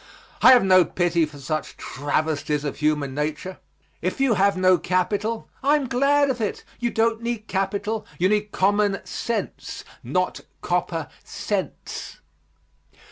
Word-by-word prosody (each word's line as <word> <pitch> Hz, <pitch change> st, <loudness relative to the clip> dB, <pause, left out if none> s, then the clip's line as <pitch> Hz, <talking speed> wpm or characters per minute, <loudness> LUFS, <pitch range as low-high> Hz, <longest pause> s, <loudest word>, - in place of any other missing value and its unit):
I -, -, +9 dB
have 245 Hz, -, +6 dB
no 185 Hz, -1 st, +6 dB
pity 170 Hz, -2 st, +1 dB
for 150 Hz, -1 st, -13 dB
such 155 Hz, +3 st, -4 dB
travesties 150 Hz, +1 st, -1 dB
of 145 Hz, -, -3 dB
human 150 Hz, -2 st, 0 dB
nature. 150 Hz, +6 st, -3 dB, 0.4 s
If -, -, -2 dB
you 270 Hz, -3 st, +3 dB
have 200 Hz, -1 st, +3 dB
no 185 Hz, -1 st, +4 dB
capital, 205 Hz, +5 st, -1 dB
I 285 Hz, +2 st, +4 dB
am 290 Hz, -3 st, 0 dB
glad 275 Hz, +2 st, +3 dB
of 245 Hz, -3 st, -4 dB
it. 210 Hz, -, -2 dB, 0.2 s
You 240 Hz, 0 st, 0 dB
don't 225 Hz, 0 st, +1 dB
need 235 Hz, -2 st, -3 dB
capital; 205 Hz, +2 st, -2 dB
you 180 Hz, -, +3 dB
need 210 Hz, +1 st, 0 dB
common 205 Hz, +1 st, +1 dB
sense, 235 Hz, -1 st, -4 dB, 0.2 s
not -, -, -1 dB, 0.2 s
copper -, -, -1 dB, 0.2 s
cents. -, -, -4 dB
195 Hz, 140 wpm, -24 LUFS, 160-230 Hz, 0.4 s, I